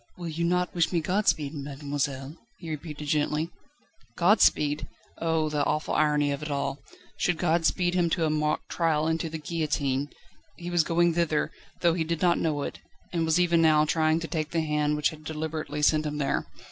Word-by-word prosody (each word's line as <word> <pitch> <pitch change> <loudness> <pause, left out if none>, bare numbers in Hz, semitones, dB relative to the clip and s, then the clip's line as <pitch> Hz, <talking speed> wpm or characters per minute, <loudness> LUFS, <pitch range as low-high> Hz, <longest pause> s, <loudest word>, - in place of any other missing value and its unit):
"Will 175 -2 -5
you 165 +2 -3
not 180 +1 +1
wish 170 -2 +1
me 175 - +2
godspeed, 170 -4 +1
mademoiselle?" 140 -1 -4 0.2
he 165 -2 -7
repeated 150 -1 -6
gently. 150 +2 0 0.7
"Godspeed?" 165 -6 +3 0.3
Oh! 160 -1 +1
the 150 -1 0
awful 155 +2 -1
irony 150 -1 +2
of 140 - -3
it 150 - -5
all! 140 -1 -2 0.4
Should 180 -2 +1
God 165 -1 +2
speed 175 -1 +1
him 175 -2 +2
to 165 0 +1
a 155 - +1
mock 150 0 0
trial 160 -3 +1
and 160 0 +1
to 165 - -3
the 160 - -5
guillotine? 150 -3 -1 0.5
He 175 0 -6
was 175 -2 +3
going 170 +1 +2
thither, 160 -3 0 0.3
though 170 -2 +4
he 165 -1 0
did 165 0 -2
not 175 -1 +4
know 150 -3 0
it, - - -5 0.3
and 165 -2 +1
was 160 +2 +2
even 170 -1 +3
now 155 -1 +5
trying 155 +1 +2
to 165 - -4
take 155 -2 -2
the 165 0 0
hand 150 -1 0
which 150 - +2
had 155 -1 -11
deliberately 155 -1 -4
sent 155 0 +3
him 150 0 -4
there. 140 -2 -1
155 Hz, 195 wpm, -27 LUFS, 150-170 Hz, 0.7 s, now